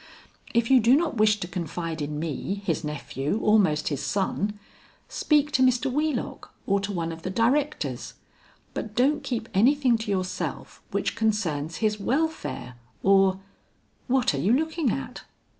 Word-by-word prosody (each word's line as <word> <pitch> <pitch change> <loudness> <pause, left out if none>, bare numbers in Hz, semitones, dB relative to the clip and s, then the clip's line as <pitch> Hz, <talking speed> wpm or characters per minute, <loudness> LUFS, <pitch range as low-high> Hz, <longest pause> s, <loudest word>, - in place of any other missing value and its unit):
If 235 +2 +2
you 260 - +8
do 240 +3 +5
not 310 -6 -1
wish 210 0 +4
to 175 - -3
confide 165 -2 -4
in 150 0 -3
me, 170 +6 -3
his 170 -3 -1
nephew 150 +3 -3
almost 190 -8 +3
his 145 -3 -3
son, 205 +1 -1 0.5
speak 295 -1 +2
to 260 - +2
Mr. 255 0 +3
Wheelock 295 -1 -2
or 200 0 +2
to 200 +1 -3
one 170 -3 -2
of 165 0 -8
the 185 - -4
directors, 265 +9 0 0.6
but 215 -1 -5
don't 285 +4 +2
keep 240 -4 -3
anything 245 +3 +4
to 225 - -5
yourself 185 -2 -3
which - - -1
concerns 170 -9 -1
his 210 0 +1
welfare 275 - -2 0.3
or 195 -1 +4 0.7
What 255 - +2
are 140 - -2
you 195 - +2
looking 315 0 +1
at?" 135 -10 -4
210 Hz, 155 wpm, -26 LUFS, 175-255 Hz, 0.7 s, you